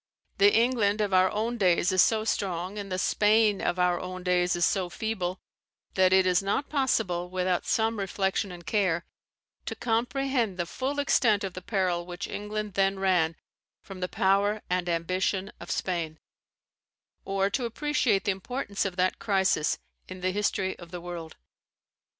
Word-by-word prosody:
The 200 +1 +7
England 225 -3 +2
of 205 -2 0
our 185 0 +5
own 230 +4 -2
days 180 -1 +3
is 185 -1 +5
so 220 -1 +3
strong, 190 -2 -2
and 200 -1 -7
the 185 - -1
Spain 210 +1 +3
of 175 - 0
our 180 -1 +2
own 185 0 -6
days 180 0 +2
is 175 0 +2
so 185 -3 0
feeble, 185 -1 -3 0.5
that 185 -1 +4
it 190 0 +5
is 180 0 +3
not 200 +8 -1
possible, 215 - 0
without 185 -1 -1
some 225 -1 +1
reflection 195 0 -1
and 175 -1 -10
care, 185 -5 +1 0.6
to - - -3
comprehend 240 -2 0
the 175 - -1
full 265 +10 -3
extent 230 -7 +3
of 190 -2 -4
the 185 - -7
peril 180 -3 0
which 175 +2 -5
England 210 0 -4
then 195 0 +1
ran 180 -4 +2 0.5
from 195 -2 -9
the 180 - -1
power 200 +2 +1
and 180 -1 0
the 175 - +1
ambition 185 +3 -1
of - - -10
Spain, 165 -4 -2 1.1
or 195 0 0
to 245 +3 -1
appreciate 235 -5 +1
the 205 - +1
importance 200 +1 -3
of 190 -2 -3
that 185 0 +1
crisis 190 -7 +1 0.3
in 185 0 -9
the 185 +1 +1
history 190 -1 -1
of 170 - -11
the 175 0 -6
world. 170 -2 -7
190 Hz, 170 wpm, -27 LUFS, 180-210 Hz, 1.1 s, The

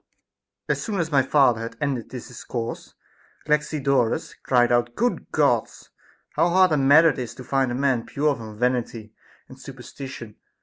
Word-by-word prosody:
9. - - +2
As - - -7
soon 210 -4 -3
as 165 -1 -2
my 140 -2 +4
father 130 -4 +3
had 115 - -7
ended 135 -7 -2
this 125 0 -8
discourse, 120 -1 -6 0.5
Galaxi 150 0 0
dorus 135 -4 0
cried 120 -2 +2
out: 120 0 +1
Good 245 +2 -1
Gods! - - 0 0.4
how 175 - +2
hard 185 0 +4
a 155 - +2
matter 145 +4 +6
is 125 -5 -6
it - - -22
to 130 - -10
find 135 0 0
a - - -2
man 130 -3 0
pure 145 0 0
from 110 -3 -10
vanity 120 -3 -2 0.3
and 130 - -14
superstition 130 -3 -10
130 Hz, 175 wpm, -23 LUFS, 120-145 Hz, 0.5 s, matter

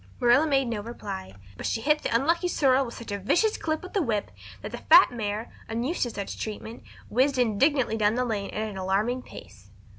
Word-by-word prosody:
Marilla 245 +6 +4
made 270 -3 +2
no 225 -3 -2
reply, 95 - -7 0.2
but - - -6
she - - -1
hit 300 +5 +2
the - - -2
unlucky 335 +9 +2
sorrel 270 -6 +2
such 235 -2 -9
a 200 - -2
vicious 420 - +2
clip 315 +1 -2
with 370 - -10
the 400 - +2
whip 220 -9 -1 0.3
that - - -6
the - - -6
fat - - +7
mare, 220 -1 -4 0.2
unused 240 +9 -2
to 240 - +1
such 200 -3 -6
treatment, 220 +1 -6 0.3
whizzed 260 +4 +2
indignantly 250 +1 +2
down 210 0 +2
the 250 0 0
lane 205 -4 -2
at 215 +1 -3
an 205 -3 -7
alarming 200 +7 0
pace. - - -13
235 Hz, 205 wpm, -26 LUFS, 210-275 Hz, 0.3 s, fat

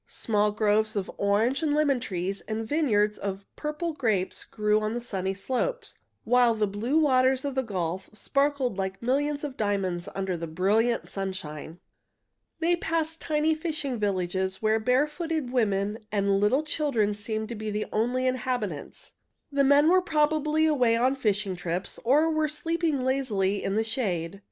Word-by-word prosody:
Small 210 -1 0
groves 215 +1 +1
of 195 -2 -2
orange 215 +8 +2
and 300 -2 +1
lemon 290 -4 +2
trees 190 -2 -3
and 220 0 -3
vineyards 215 -9 +1
of 195 0 -4
purple 305 +2 -3
grapes 215 -10 0
grew 210 0 +1
on 215 +1 -2
the - - -1
sunny 195 -5 -3
slopes, 260 - -2 0.2
while 240 0 +4
the 215 -1 +1
blue 215 +9 -1
waters 260 -3 +3
of 280 - -2
the 265 - +1
gulf 185 -6 -3
sparkled 275 -1 0
like 190 0 -3
millions 285 +4 0
of 285 -3 -4
diamonds 195 -4 -1
under 190 -2 -1
the 165 0 -5
brilliant 210 +8 +1
sunshine. 175 -4 -6 0.8
They 335 +1 +2
passed 325 -1 -2
tiny 310 +1 +1
fishing 310 -6 -3
villages 190 -1 -1
where 220 0 +2
barefooted 295 +4 0
women 210 -3 +1
and 200 -1 +2
little 250 +9 +2
children 280 -9 0
seemed 215 +1 -4
to 235 - -4
be 215 0 -4
the 210 0 -2
only 245 +4 +1
inhabitants. 245 - -3 0.4
The 280 0 +2
men 285 +2 +5
were 370 +2 +5
probably 310 -1 +2
away 250 -7 +3
on 255 +3 +2
fishing 210 -6 0
trips, 180 +1 -4
or 285 +7 +4
were 310 -1 +1
sleeping 315 -2 -1
lazily 215 -7 0
in 195 - -1
the 220 - +2
shade. 200 -7 -2
225 Hz, 160 wpm, -27 LUFS, 200-285 Hz, 0.8 s, men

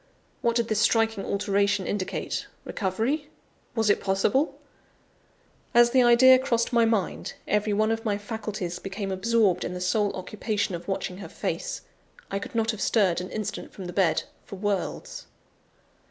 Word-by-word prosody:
What 235 -1 +1
did 235 -1 +1
this 215 -2 0
striking 225 -2 +2
alteration 200 -1 +1
indicate? 200 -2 -3 0.2
Recovery? 230 +10 -1 0.5
Was 225 -2 +1
it 205 - +3
possible? 200 +9 +1 1.2
As 240 0 +7
the 260 0 +5
idea 250 +2 +7
crossed 235 -2 0
my 235 -1 +5
mind, 225 -4 -1
every 210 0 +1
one 215 +2 +2
of 225 0 -2
my 210 -3 0
faculties 205 -4 -5
became 195 0 -4
absorbed 205 0 +2
in 180 - -4
the - - -4
sole 200 +3 +1
occupation 205 +1 -2
of 170 - -6
watching 190 -2 -3
her 200 - -8
face; - - -3 0.5
I 195 - -1
could 200 - -8
not 225 0 +2
have 215 - -7
stirred 190 -6 +2
an 185 - -6
instant 215 -2 -5
from 190 - -8
the 180 - -6
bed, 175 -4 +2 0.2
for - - -9
worlds. 205 - -3
210 Hz, 160 wpm, -26 LUFS, 195-230 Hz, 1.2 s, As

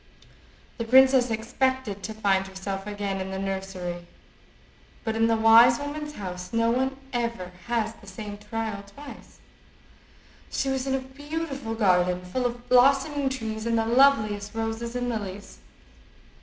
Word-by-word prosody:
The - - 0
princess 260 +1 +5
expected 230 -1 -1
to 215 +3 -5
find 195 -3 +1
herself 195 +1 -5
again 200 -2 -3
in 190 - -4
the 190 - -4
nursery, 190 -3 -4 1.0
but 220 -1 -2
in 225 0 +3
the 230 - +3
wise 230 +2 +7
woman's 295 +1 -5
house 180 -5 -7
no 230 0 +2
one 260 +2 0 0.2
ever 235 -7 -2 0.2
has 230 -2 0
the 205 - -18
same 205 +1 -7
trial 215 -1 -4
twice. 275 +9 -13 1.1
She 270 - -1
was 265 0 -1
in 270 - +1
a 265 - -2
beautiful 275 -2 -5
garden, 180 -4 +2
full 245 +7 -1
of 240 0 -8
blossoming 275 +3 +4
trees 220 -4 -4
and 230 0 +1
the 225 - +1
loveliest 225 -5 +3
roses 225 +1 -3
and 245 0 -1
lilies. 205 -4 -5
225 Hz, 145 wpm, -26 LUFS, 200-260 Hz, 1.1 s, wise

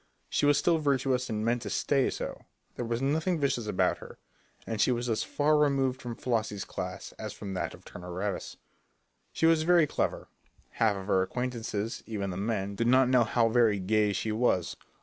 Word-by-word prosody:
She 145 - +2
was 145 -1 +5
still 165 +1 +2
virtuous 135 -3 +1
and 110 0 -2
meant 120 +1 +1
to - - -5
stay 140 -3 +1
so; - - -6 0.3
there 120 - -4
was 115 +2 -2
nothing 160 +5 +1
vicious 130 -6 0
about 100 - +1
her, - - -11 0.5
and 110 -2 -2
she - - +4
was 120 0 -1
as 110 - 0
far 150 +1 +1
removed 135 -3 +1
from 120 -1 -5
Flossie's 110 -5 -2
class - - -6
as - - -5
from 100 -1 -7
that 90 - -3
of - - -20
Turner 90 0 -9
Ravis. 95 +3 -4 0.7
She - - 0
was 165 -1 +5
very 170 0 +5
clever; - - -2 0.4
half 110 -3 +2
of 95 -1 -6
her 95 -2 +2
acquaintances, 115 0 -3
even 100 -3 -3
the 90 - -5
men, 100 -1 -2
did 115 +4 -1
not 130 +1 +5
know 125 -2 +5
how 115 +1 +2
very 115 -3 +3
"gay" 105 +2 +2
she 105 +3 -2
was. 105 -6 +1
120 Hz, 195 wpm, -29 LUFS, 105-135 Hz, 0.7 s, was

